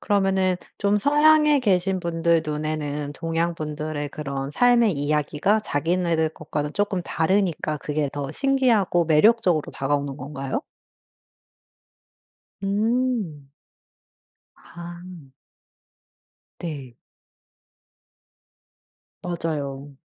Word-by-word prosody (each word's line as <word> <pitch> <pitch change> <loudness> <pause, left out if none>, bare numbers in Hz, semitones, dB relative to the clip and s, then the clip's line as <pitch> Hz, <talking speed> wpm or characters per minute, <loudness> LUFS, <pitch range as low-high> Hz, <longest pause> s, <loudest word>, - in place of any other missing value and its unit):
그러면은 190 -2 +2 0.2
좀 205 +1 +2
서양에 300 +3 +5
계신 190 -4 +1
분들 170 -1 +1
눈에는 150 -1 -3
동양분들의 155 -3 -3
그런 140 -2 -4
삶의 235 0 +4
이야기가 150 +7 +1
자기네들 165 0 0
것과는 150 -1 -4
쪼끔 205 -2 0
다르니까 165 -3 0
그게 150 0 -2
더 140 -2 -4
신기하고 235 - +2
매력적으로 175 0 +3
다가오는 140 0 -1
건가요? 135 -1 -4 2.0
음. 210 - -1 1.1
아. 175 -3 -11 1.3
네. 140 -8 -6 2.3
맞아요. 145 -5 -4
165 Hz, 195 characters per minute, -24 LUFS, 150-195 Hz, 2.3 s, 서양에